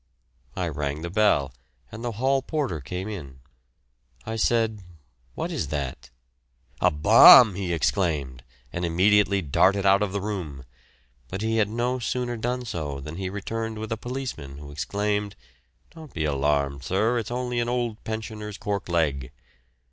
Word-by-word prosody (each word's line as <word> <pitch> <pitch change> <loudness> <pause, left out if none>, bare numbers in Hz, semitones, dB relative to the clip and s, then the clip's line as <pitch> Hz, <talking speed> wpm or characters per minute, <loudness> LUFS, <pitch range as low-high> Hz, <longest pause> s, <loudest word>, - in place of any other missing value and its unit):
I - - -1
rang 75 +1 -3
the 85 - -4
bell 85 -10 +2 0.4
and 115 - -8
the 120 -1 -3
hall 135 +5 +1
porter 135 - -2
came 90 +8 -5
in; 70 -11 -8 0.9
I 110 - -4
said, 110 -2 +1 0.5
"What - - -3
is - - -2
that?" 70 -4 -4 0.7
"A - - +4
bomb!" 95 +8 +8
he 90 -1 -3
exclaimed, 75 -8 -1 0.3
and 85 - -3
immediately 100 +3 +3
darted 95 +7 +2
out 100 +1 +5
of 105 -2 0
the 100 - -2
room, 90 -10 -5 0.6
but 95 - -5
he 110 0 0
had 105 -2 +2
no 120 +3 -1
sooner 120 +1 -2
done 125 +2 -3
so 75 -9 -4
than 75 +4 -8
he 95 -1 -3
returned 110 +3 -4
with 110 0 -6
a - - +1
policeman, 120 - -6
who 70 0 -10
exclaimed, 105 +7 -2 0.6
"Don't 160 -4 -13
be 80 -2 -1
alarmed, 70 -1 0
sir, 110 - +1
it's 110 - -5
only 125 0 -2
an 120 0 -1
old 120 -3 -2
pensioner's 110 -1 -5
cork 100 -3 -3
leg." 70 -7 0
100 Hz, 155 wpm, -25 LUFS, 75-115 Hz, 0.9 s, bomb